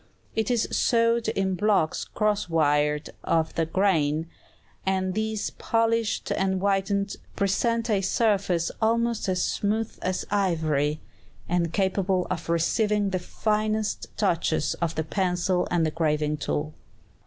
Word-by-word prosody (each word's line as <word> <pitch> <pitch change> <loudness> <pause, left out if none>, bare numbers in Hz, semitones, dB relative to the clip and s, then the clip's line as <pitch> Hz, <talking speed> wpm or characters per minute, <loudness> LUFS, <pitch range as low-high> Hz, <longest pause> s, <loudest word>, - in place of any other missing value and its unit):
It 220 0 0
is 240 -3 +1
sawed 230 -1 +2
in 195 -3 0
blocks 195 -4 +1
crosswise 155 -8 +1 0.2
of 160 -1 +1
the 165 -1 0
grain, 160 -5 +1 0.6
and 190 -1 0
these 220 0 -2
polished 230 -1 0
and 190 -1 +1
whitened, 200 +1 0 0.2
present 230 +4 +1
a 205 -4 +2
surface 195 -5 +1
almost 230 -1 +1
as 185 -1 +1
smooth 215 +2 -1
as 185 0 -2
ivory, 155 -7 +1 0.5
and 170 -1 0
capable 190 -1 +1
of 170 -2 -4
receiving 205 +5 +1
the 185 - 0
finest 215 +2 -1
touches 165 -6 +1
of 165 -1 -1
the 160 - -1
pencil 180 +1 0
and 170 -2 +2
the 155 - 0
graving 150 -2 0
tool. 150 +1 -3
190 Hz, 125 wpm, -26 LUFS, 165-215 Hz, 0.6 s, sawed